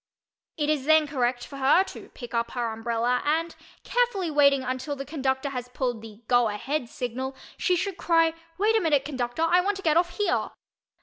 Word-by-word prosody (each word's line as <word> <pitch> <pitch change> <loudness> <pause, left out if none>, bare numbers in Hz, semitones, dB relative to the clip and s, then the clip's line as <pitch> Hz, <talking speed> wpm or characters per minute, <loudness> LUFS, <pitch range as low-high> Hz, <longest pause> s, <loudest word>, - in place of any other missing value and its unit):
It 295 -2 0
is 285 -3 -1
then 315 0 +5
correct 250 -4 -1
for 275 - -10
her 275 +7 +5
to - - -10
pickup 235 -2 -3
her 240 -2 -1
umbrella 235 +2 0
and, 325 +3 0 0.3
carefully 470 -9 0
waiting 280 -2 +4
until 260 +3 -3
the 275 0 -6
conductor 270 -2 -1
has 250 -2 -5
pulled 245 -3 -2
the 220 0 -12
"go 245 -1 +4
ahead" 240 +5 -3
signal, 255 +3 -4 0.2
she 365 - +1
should 380 +1 -2
cry 330 -1 +3 0.2
"Wait 430 +3 +3
a 445 - +3
minute, 295 -5 +2
conductor—I 300 +6 +1
want 400 +2 -1
to 390 - -9
get 315 -1 +3
off 350 0 +1
here." 415 - 0
280 Hz, 185 wpm, -26 LUFS, 245-330 Hz, 0.3 s, then